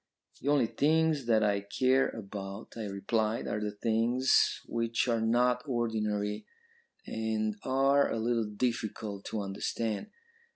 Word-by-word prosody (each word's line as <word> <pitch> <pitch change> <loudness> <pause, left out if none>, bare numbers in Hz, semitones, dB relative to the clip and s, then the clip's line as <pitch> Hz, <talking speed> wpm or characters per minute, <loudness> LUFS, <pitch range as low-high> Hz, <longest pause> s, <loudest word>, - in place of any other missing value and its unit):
"'The 135 - -6
only 145 -4 +4
things 155 +1 +2
that 110 -2 +4
I 100 -1 +2
care 130 +6 +2
about,' 100 -1 -7
I 115 -2 -4
replied, 110 +3 -1
'are 105 - -1
the 105 - -1
things 115 +5 +2
which 115 +1 -1
are 115 -2 +1
not 125 +2 +2
ordinary, 105 -4 -1 0.6
and 110 -1 -1
are 135 +2 +3
a - - -1
little 115 0 +1
difficult 110 -3 -3
to 110 - -3
understand. 100 +2 -3
115 Hz, 130 wpm, -30 LUFS, 105-125 Hz, 0.6 s, only